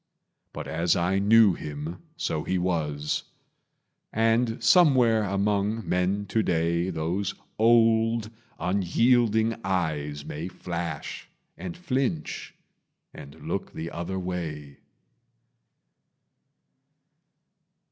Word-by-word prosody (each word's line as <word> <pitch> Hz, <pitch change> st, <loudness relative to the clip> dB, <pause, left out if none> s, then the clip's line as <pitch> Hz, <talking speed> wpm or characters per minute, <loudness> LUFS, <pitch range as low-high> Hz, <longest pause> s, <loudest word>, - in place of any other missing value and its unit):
But -, -, -7 dB
as 85 Hz, +2 st, +1 dB
I 90 Hz, +3 st, +1 dB
knew 105 Hz, 0 st, +6 dB
him, 75 Hz, +2 st, -6 dB, 0.2 s
so 120 Hz, -, -2 dB
he 95 Hz, -, -1 dB
was; 75 Hz, -5 st, -1 dB, 0.9 s
And 115 Hz, +1 st, +1 dB
somewhere 125 Hz, -6 st, +5 dB
among 100 Hz, +2 st, 0 dB
men 95 Hz, +3 st, 0 dB
to 110 Hz, -, +2 dB
day 85 Hz, -1 st, +1 dB
Those 95 Hz, +4 st, -2 dB, 0.2 s
old, 115 Hz, -1 st, +4 dB, 0.3 s
unyielding 110 Hz, +4 st, +2 dB
eyes 75 Hz, -6 st, -2 dB
may 80 Hz, +4 st, -5 dB
flash, 85 Hz, -2 st, -5 dB, 0.3 s
And 180 Hz, -, -7 dB
flinch 130 Hz, -, -2 dB, 0.6 s
and 70 Hz, -, -11 dB
look -, -, -3 dB
the 80 Hz, +1 st, -5 dB
other 85 Hz, +3 st, -4 dB
way. 80 Hz, -6 st, -5 dB
95 Hz, 90 wpm, -26 LUFS, 85-115 Hz, 0.9 s, knew